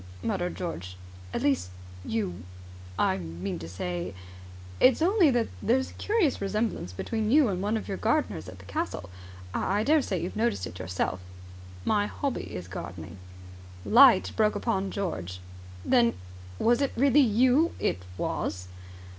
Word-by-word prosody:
muttered 175 Hz, 0 st, -1 dB
George. 90 Hz, -, -5 dB, 0.3 s
"At -, -, -3 dB
least, 130 Hz, -11 st, +1 dB, 0.3 s
you 95 Hz, -3 st, -2 dB, 0.6 s
I 95 Hz, -, +2 dB
mean 85 Hz, +1 st, -5 dB
to 80 Hz, 0 st, -8 dB
say... 90 Hz, 0 st, -4 dB, 0.6 s
It's 255 Hz, -1 st, +5 dB
only 360 Hz, 0 st, +4 dB
that 240 Hz, -3 st, +1 dB
there's 260 Hz, +3 st, +1 dB
a -, -, -15 dB
curious 415 Hz, -, +1 dB
resemblance 210 Hz, -, -1 dB
between 215 Hz, -, -2 dB
you 280 Hz, -1 st, +5 dB
and 185 Hz, -2 st, -2 dB
one 210 Hz, +3 st, 0 dB
of -, -, -6 dB
your 195 Hz, -, -3 dB
gardeners 225 Hz, -, 0 dB
at 90 Hz, -, -11 dB
the 95 Hz, -, -14 dB
castle. 90 Hz, -1 st, -4 dB, 0.4 s
I 200 Hz, +3 st, 0 dB
I -, -, 0 dB
daresay 280 Hz, -8 st, +2 dB
you 165 Hz, -, -3 dB
have -, -, -13 dB
noticed 225 Hz, -, 0 dB
it 90 Hz, -, -9 dB
yourself." 90 Hz, +1 st, -2 dB, 0.7 s
"My 205 Hz, -1 st, +2 dB
hobby 275 Hz, +2 st, -4 dB
is 90 Hz, 0 st, -6 dB
gardening." 90 Hz, 0 st, -8 dB, 0.7 s
Light 240 Hz, -4 st, +7 dB
broke 215 Hz, -1 st, +3 dB
upon 195 Hz, -5 st, -1 dB
George. 90 Hz, -, -4 dB, 0.5 s
"Then 240 Hz, -2 st, +4 dB, 0.4 s
was 240 Hz, +4 st, +3 dB
it 275 Hz, -, 0 dB
really 275 Hz, +2 st, +5 dB
you 255 Hz, +6 st, +4 dB
?" -, -, -15 dB
"It 90 Hz, -, 0 dB, 0.2 s
was!" 90 Hz, 0 st, -3 dB
200 Hz, 155 wpm, -28 LUFS, -, 0.7 s, Light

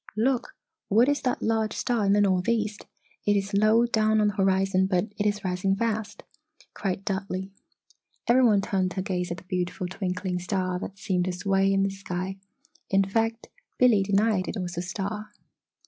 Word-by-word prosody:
"Look! 245 Hz, +2 st, 0 dB, 0.3 s
What 225 Hz, +5 st, +5 dB
is 285 Hz, 0 st, +1 dB
that 250 Hz, -, -1 dB
large 220 Hz, -1 st, +1 dB
star 235 Hz, -5 st, 0 dB
in 195 Hz, -, +4 dB
the 205 Hz, -, +4 dB
northeast 205 Hz, +2 st, 0 dB, 0.4 s
it 205 Hz, -, +4 dB
is 200 Hz, +1 st, -3 dB
low 215 Hz, +3 st, +4 dB
down 220 Hz, -2 st, +2 dB
on 210 Hz, -1 st, +3 dB
the -, -, -4 dB
horizon 190 Hz, -1 st, +2 dB
but 180 Hz, -2 st, +2 dB, 0.2 s
it 210 Hz, -, +2 dB
is 205 Hz, 0 st, -1 dB
rising 185 Hz, +1 st, 0 dB
fast?" 220 Hz, 0 st, -2 dB, 0.5 s
cried 195 Hz, 0 st, -3 dB
Dudley. 190 Hz, -1 st, -3 dB, 0.8 s
Every 255 Hz, +2 st, +5 dB
one 210 Hz, -5 st, +5 dB
turned 190 Hz, -2 st, 0 dB
to 190 Hz, -, -2 dB
gaze 180 Hz, -3 st, -2 dB
at 175 Hz, -, -4 dB
the -, -, -12 dB
beautiful 180 Hz, 0 st, -3 dB
twinkling 185 Hz, 0 st, -3 dB
star 185 Hz, 0 st, -1 dB
that 195 Hz, -, -7 dB
seemed 185 Hz, -3 st, 0 dB
to 185 Hz, -, -1 dB
sway 195 Hz, +2 st, +1 dB
in 195 Hz, 0 st, +2 dB
the 195 Hz, -, 0 dB
sky. 190 Hz, -1 st, -5 dB, 0.5 s
In 195 Hz, 0 st, +4 dB
fact 225 Hz, +3 st, -1 dB, 0.3 s
Billy 245 Hz, -5 st, +5 dB
denied 200 Hz, 0 st, +1 dB
it -, -, -4 dB
was 175 Hz, -1 st, -4 dB
a 170 Hz, -, -2 dB
star. 200 Hz, +3 st, -4 dB
195 Hz, 180 wpm, -26 LUFS, 185-215 Hz, 0.8 s, What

